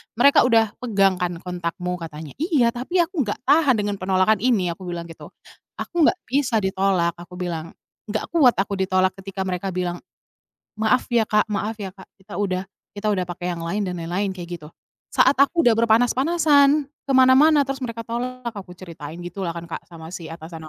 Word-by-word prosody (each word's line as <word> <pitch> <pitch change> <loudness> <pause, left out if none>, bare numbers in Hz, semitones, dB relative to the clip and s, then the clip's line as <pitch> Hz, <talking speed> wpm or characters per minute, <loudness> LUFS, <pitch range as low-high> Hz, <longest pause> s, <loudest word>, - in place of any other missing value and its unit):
mereka 250 +2 +5
udah 225 -3 +3
pegang 195 -6 +2
kan 180 -1 -1
kontakmu," 180 0 -4
katanya. 160 -2 -8
"Iya, 295 -8 +2
tapi 305 +10 0
aku 330 - -2
nggak 205 - -4
tahan 285 -1 +4
dengan 205 -2 -2
penolakan 190 +3 +2
ini," 205 -6 +1
aku 180 +2 -9
bilang 175 -1 -4
gitu. - - -11 0.5
"Aku 345 - -5
nggak 320 - +5
bisa 245 -4 0
ditolak," 190 -2 +1
aku 175 +1 -11
bilang. 170 -3 -5 0.3
"Nggak 215 0 -4
kuat 290 -8 +5
aku 195 0 -2
ditolak 185 0 +2
ketika 195 0 -5
mereka 185 0 -3
bilang, 175 -1 -2 0.8
'maaf 220 +4 +1
ya 235 -3 +3
Kak 210 0 +1
maaf 210 +1 -3
ya 195 -1 -6
Kak, 190 - -12 0.2
kita 190 - -10
udah 190 -1 -2 0.2
kita 205 +1 -3
udah 195 -3 +1
pakai 175 0 -5
yang 165 - -6
lain,' 195 +4 -2
dan 180 - -4
lain-lain," 185 +3 -2
kayak 175 -1 -7
gitu. 150 - -11 0.4
"Saat 265 - +4
aku 330 +4 +4
udah 240 - +6
berpanas-panasan, 280 +6 +3 0.3
ke - - +4
mana-mana 275 +3 +6
terus 275 0 -4
mereka 230 -2 -5
tolak," 240 0 -4
aku 195 -3 -9
ceritain 165 -3 -9
gitu 175 +3 -7
lah 175 - -1
kan 170 - -6
Kak 165 - -6
sama 165 0 -10
si 170 - -7
atasan 160 0 -9
200 Hz, 190 wpm, -22 LUFS, 180-245 Hz, 0.8 s, udah